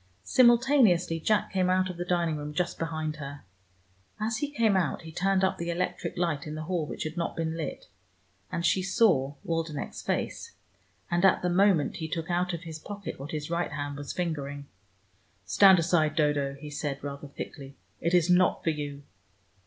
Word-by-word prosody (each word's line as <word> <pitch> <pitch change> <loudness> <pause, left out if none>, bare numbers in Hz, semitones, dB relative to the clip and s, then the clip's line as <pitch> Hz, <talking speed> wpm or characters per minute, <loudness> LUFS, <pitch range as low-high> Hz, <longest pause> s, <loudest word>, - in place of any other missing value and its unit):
Simultaneously, 235 - +4
Jack 210 +6 +1
came 185 -1 +2
out 185 0 +3
of 180 - -5
the 175 - -2
dining 170 -3 +1
room 150 0 -6
just 175 +1 -1
behind 155 -2 -3
her. 145 -1 -8 0.8
As 220 +1 -1
he 290 +4 -2
came 230 -8 +2
out 185 -2 0
he 160 - -9
turned 195 +3 +1
up 190 - +1
the 170 0 -3
electric 175 0 -2
light 165 -5 -1
in 150 - -5
the 155 - -4
hall 165 -2 -2
which - - -5
had 155 +2 -5
not 170 - -2
been 160 -1 -2
lit, 165 - -5 0.7
and 170 - -2
she 175 +2 +3
saw 185 - +2
Waldenech's 165 -3 -3
face. 465 - -3 0.6
And 175 +1 +1
at 190 -2 +4
the 180 - +1
moment 185 -4 +3
he 160 - -4
took 165 +1 -3
out 180 +1 +1
of 170 -2 -4
his 160 -2 -7
pocket 200 0 -7
what 140 +2 -7
his 150 0 -4
right 170 -2 -1
hand 145 -1 -4
was 145 -1 -5
fingering. 145 -5 -3 0.8
"Stand 195 -2 +7
aside, 160 -3 +2
Dodo," 145 -3 +1
he 150 +2 -9
said 145 -1 -4
rather 140 0 -6
thickly. 140 0 -8 0.2
"It 170 +2 +1
is 175 -2 +4
not 180 0 +3
for 165 - +2
you." 145 -2 -5
170 Hz, 190 wpm, -28 LUFS, 150-185 Hz, 0.8 s, Stand